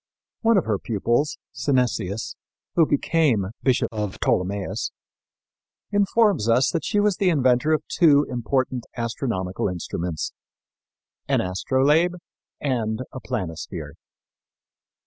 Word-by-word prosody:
One 225 -2 +4
of 185 - +2
her 105 -3 0
pupils, 120 +7 0 0.2
Synesius, 115 -7 -1 0.4
who 165 -3 +4
became 140 - +2
Bishop 130 -2 +2
of 105 -3 -4
Ptolemais, 95 +2 -1 1.0
informs 205 - +3
us 125 +3 +4
that 165 - -1
she 205 - +1
was 205 -2 +2
the 195 - +3
inventor 130 -2 +3
of 155 - +2
two 150 -4 +4
important 125 0 -1
astronomical 115 -6 -2
instruments: 85 -2 -4 0.9
an - - +2
astrolabe 140 - +2 0.4
and 115 -5 -1
a 130 - -7
planisphere. 95 -12 -5
125 Hz, 110 wpm, -24 LUFS, 105-155 Hz, 1.0 s, One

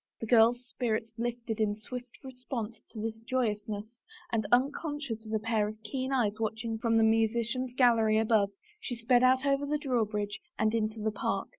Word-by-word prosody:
The - - -4
girl's 240 +2 +4
spirits 225 -1 -2
lifted 235 -1 -3
in 210 -1 +1
swift 245 +4 -9
response 250 -4 -6
to 220 -1 -5
its 225 0 -4
joyousness 215 -4 -2 0.5
and 220 -2 +1
unconscious 270 -3 0
of - - -7
a 220 - +2
pair 220 -1 0
of 215 0 -7
keen 260 +5 -3
eyes 220 -5 +1
watching 225 +1 -2
from 225 -1 +2
the 225 - +5
musician's 230 +3 +1
gallery 230 -4 +4
above 220 -2 +3 0.3
she 260 - -4
sped 240 +1 +3
out 260 +1 +4
over 280 0 +1
the 300 +1 +1
drawbridge 215 -7 -1 0.2
and 220 0 +2
into 220 -1 -1
the 220 +1 0
park. 210 - -2
225 Hz, 175 wpm, -30 LUFS, 220-250 Hz, 0.5 s, the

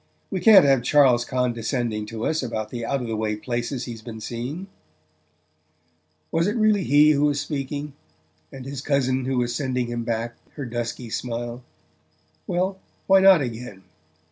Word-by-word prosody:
We 185 - -1
can't 195 -3 +8
have 135 -3 +4
Charles 125 -2 +4
condescending 120 -3 -1
to 115 0 -5
us 160 0 0
about 110 -4 -4
the 120 -1 -5
out 135 +2 -1
of - - -5
the 115 - -2
way 110 -1 -1
places 120 +3 -3
he's 115 -3 -7
been 110 -1 -8
seeing." 125 - -5 1.7
Was 165 +2 +1
it 210 - -1
really 215 -3 +3
he 150 0 +5
who 145 0 +2
was 145 -1 +1
speaking, 145 0 -4 0.6
and 130 -1 -9
his 135 -1 -5
cousin 130 -3 0
who 130 0 -1
was 120 -1 0
sending 130 -3 -1
him 120 0 -3
back 115 0 -3 0.2
her 145 - -5
dusky 120 0 -5
smile? 120 0 -4 0.9
Well 185 +2 -1 0.3
why 195 0 +6
not, 190 -4 +7
again? 115 -6 -6
125 Hz, 165 wpm, -24 LUFS, 120-145 Hz, 1.7 s, can't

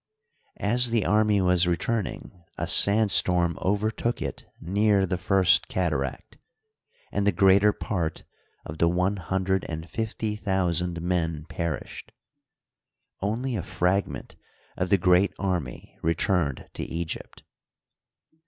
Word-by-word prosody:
As 120 +3 +3
the 115 -2 +1
army 105 -1 +3
was 90 -1 +3
returning, 90 0 -3
a - - -2
sand 105 +1 +5
storm 85 -3 +2
overtook 110 +4 -1
it - - -6
near 100 +2 +2
the 90 -1 -3
First 95 -2 +3
Cataract, 75 -7 -3 0.7
and 100 0 -1
the - - +5
greater 100 +3 +4
part 85 -5 -3 0.4
of 75 +1 -8
the 85 - +4
one 90 +4 0
hundred 95 +1 -1
and 80 0 -6
fifty 110 0 -3
thousand 90 -4 -1
men 85 -4 -1
perished. 85 -4 -5 1.1
Only 115 +6 -2
a 100 - -2
fragment 90 +3 -2 0.4
of 90 - -2
the 100 - +4
great 90 +2 +3
army 90 -10 -4
re 85 +1 +1
turned 85 -9 -1
to - - -5
Egypt. 85 0 -6
95 Hz, 125 wpm, -26 LUFS, 85-100 Hz, 1.1 s, sand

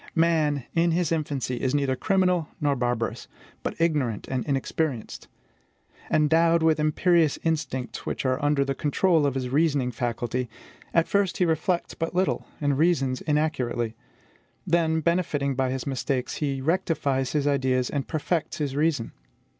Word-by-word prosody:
Man, 160 -4 +2
in 170 +1 +3
his 170 0 0
infancy, 145 -6 -1
is 130 +1 0
neither 140 -2 +1
criminal 180 0 +1
nor 145 -1 +1
barbarous, 120 -2 -2 0.3
but - - -4
ignorant 145 -10 0
and 130 -2 -2
inexperienced. 135 -2 -2 0.8
Endowed 165 +2 +3
with 160 -1 +3
imperious 155 +1 +3
instincts 150 -6 -2
which - - -3
are 130 +3 0
under 145 -1 +2
the 135 - -1
control 150 +2 +2
of 135 - -2
his 130 -1 -2
reasoning 140 -3 +2
faculty, 120 +1 -2 0.4
at 165 -1 +3
first 200 -2 +1
he 180 - +3
reflects 170 +2 0
but 165 +1 -4
little, 185 +1 0
and 145 -2 0
reasons 140 -6 +2
inaccurately; 125 -7 0 0.7
then, 160 -1 +2
benefiting 155 -5 0
by 130 0 0
his 130 0 -3
mistakes, 135 -2 -2
he 140 -3 -2
rectifies 145 -5 0
his 150 -2 +1
ideas, 130 -3 +1
and 140 -2 -3
perfects 160 +1 -2
his 145 -4 -2
reason. 145 -5 0
145 Hz, 145 wpm, -26 LUFS, 130-165 Hz, 0.8 s, in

